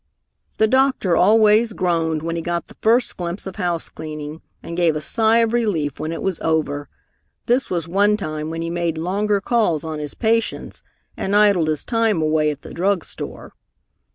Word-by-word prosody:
The 220 Hz, -, +4 dB
doctor 260 Hz, -7 st, +2 dB
always 215 Hz, +4 st, +4 dB
groaned 165 Hz, -4 st, 0 dB
when 165 Hz, 0 st, -2 dB
he 165 Hz, -, -2 dB
got 170 Hz, 0 st, -2 dB
the -, -, -16 dB
first 230 Hz, +2 st, +2 dB
glimpse 175 Hz, +1 st, -4 dB
of 190 Hz, -, -7 dB
housecleaning, 155 Hz, -3 st, -4 dB, 0.2 s
and 170 Hz, -, -6 dB
gave 170 Hz, -3 st, +2 dB
a -, -, -1 dB
sigh 220 Hz, +9 st, +3 dB
of 225 Hz, -, -4 dB
relief 180 Hz, -, 0 dB
when 155 Hz, -, -3 dB
it 165 Hz, -, -5 dB
was 190 Hz, -3 st, -1 dB
over. 150 Hz, -3 st, -1 dB, 0.6 s
This 250 Hz, +3 st, +1 dB
was 170 Hz, -3 st, -1 dB
one 205 Hz, +4 st, +3 dB
time 155 Hz, -5 st, -4 dB
when 165 Hz, +1 st, -4 dB
he 165 Hz, -, -3 dB
made 170 Hz, -2 st, -1 dB
longer 200 Hz, +5 st, 0 dB
calls 195 Hz, -8 st, +1 dB
on 160 Hz, -1 st, -4 dB
his 150 Hz, -1 st, -6 dB
patients 230 Hz, 0 st, -1 dB, 0.3 s
and 195 Hz, +1 st, -2 dB
idled 200 Hz, -6 st, +4 dB
his 155 Hz, -1 st, -1 dB
time 225 Hz, -6 st, +1 dB
away 155 Hz, -1 st, +2 dB
at 150 Hz, -, -6 dB
the -, -, -10 dB
drug 190 Hz, 0 st, 0 dB
store. -, -, -8 dB
175 Hz, 180 wpm, -21 LUFS, 160-210 Hz, 0.6 s, The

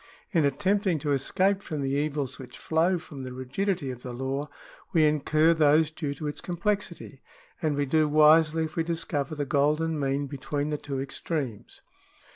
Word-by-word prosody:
In 165 Hz, -7 st, +3 dB
attempting 195 Hz, +4 st, +1 dB
to 145 Hz, 0 st, -2 dB
escape 190 Hz, +8 st, +1 dB
from 155 Hz, -6 st, -4 dB
the 135 Hz, -, -1 dB
evils 145 Hz, -2 st, -2 dB
which 130 Hz, -, -10 dB
flow 165 Hz, +3 st, +1 dB
from 150 Hz, -5 st, -9 dB
the 130 Hz, -1 st, -6 dB
rigidity 135 Hz, +4 st, -2 dB
of 125 Hz, -1 st, -9 dB
the 125 Hz, -, -6 dB
law, 135 Hz, +4 st, -3 dB, 0.4 s
we 160 Hz, -2 st, +5 dB
incur 155 Hz, +2 st, +3 dB
those 155 Hz, 0 st, +4 dB
due 145 Hz, -2 st, -4 dB
to 150 Hz, -, -7 dB
its 145 Hz, -, -4 dB
complexity, 175 Hz, -5 st, -3 dB, 0.4 s
and 155 Hz, -3 st, +1 dB
we 145 Hz, 0 st, 0 dB
do 155 Hz, +2 st, +2 dB
wisely 155 Hz, +1 st, +5 dB
if 155 Hz, -1 st, -5 dB
we 165 Hz, -, +1 dB
discover 160 Hz, -3 st, -2 dB
the 145 Hz, -1 st, -2 dB
golden 150 Hz, +3 st, +1 dB
mean 140 Hz, 0 st, 0 dB
between 145 Hz, +2 st, -3 dB
the 150 Hz, -, -2 dB
two 140 Hz, -2 st, -4 dB
extremes. 135 Hz, -4 st, -5 dB
150 Hz, 175 wpm, -27 LUFS, 140-165 Hz, 0.4 s, we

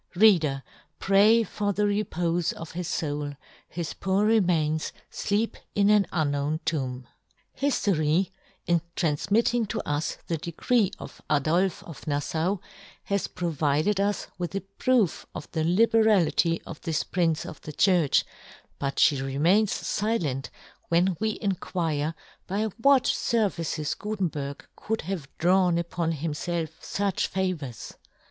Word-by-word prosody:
Reader, 165 Hz, -9 st, +4 dB, 0.3 s
pray 210 Hz, +4 st, +5 dB
for 205 Hz, -1 st, -2 dB
the 210 Hz, -, 0 dB
repofe 175 Hz, -5 st, 0 dB
of 165 Hz, -, -8 dB
his 175 Hz, 0 st, -4 dB
foul: 145 Hz, -3 st, -3 dB, 0.4 s
his 165 Hz, -3 st, -4 dB
poor 195 Hz, +2 st, +1 dB
remains 170 Hz, -8 st, +2 dB, 0.2 s
fleep 210 Hz, +2 st, -1 dB, 0.2 s
in 205 Hz, 0 st, +4 dB
an 210 Hz, -2 st, +4 dB
unknown 145 Hz, -1 st, 0 dB
tomb. 130 Hz, -5 st, -2 dB, 0.6 s
ISTORY, 185 Hz, -, +2 dB, 0.3 s
in 170 Hz, -2 st, +2 dB
tranfmitting 210 Hz, +8 st, +1 dB
to -, -, -3 dB
us 145 Hz, +1 st, -1 dB
the 165 Hz, -, -1 dB
decree 185 Hz, -, +1 dB
of -, -, -10 dB
Adolfe 160 Hz, +6 st, +1 dB
of 165 Hz, -2 st, -11 dB
Naflau, 160 Hz, +6 st, 0 dB, 0.4 s
has 200 Hz, -1 st, -1 dB
provided 160 Hz, +2 st, 0 dB
us 200 Hz, 0 st, 0 dB
with 175 Hz, +2 st, -3 dB
a 195 Hz, -, -1 dB
proof 200 Hz, 0 st, 0 dB
of -, -, -6 dB
the 160 Hz, -1 st, -1 dB
libe 185 Hz, +8 st, +3 dB
rahty 190 Hz, -6 st, +3 dB
of 160 Hz, -, -9 dB
this 160 Hz, -2 st, -1 dB
Prince 165 Hz, -4 st, 0 dB
of 155 Hz, -, -9 dB
the 155 Hz, -, -7 dB
Church, 170 Hz, -2 st, +3 dB, 0.5 s
but 140 Hz, 0 st, -2 dB
fhe 140 Hz, -3 st, +3 dB
remains 170 Hz, +11 st, +2 dB
filent 170 Hz, -, -1 dB, 0.4 s
when 175 Hz, +2 st, +3 dB
we 220 Hz, -, +1 dB
in 205 Hz, -2 st, -1 dB
quire 165 Hz, -4 st, -2 dB, 0.3 s
by 200 Hz, +3 st, -1 dB, 0.2 s
what 275 Hz, 0 st, +6 dB
fervices 170 Hz, -9 st, 0 dB
Gutenberg 170 Hz, -10 st, -3 dB
could 220 Hz, +1 st, -3 dB
have 175 Hz, -5 st, -4 dB
drawn 180 Hz, 0 st, +3 dB
upon 170 Hz, -1 st, -1 dB
himfelf 160 Hz, +2 st, -2 dB
fuch 200 Hz, -2 st, -1 dB
favours. 180 Hz, -10 st, -3 dB
175 Hz, 130 wpm, -26 LUFS, 155-200 Hz, 0.6 s, what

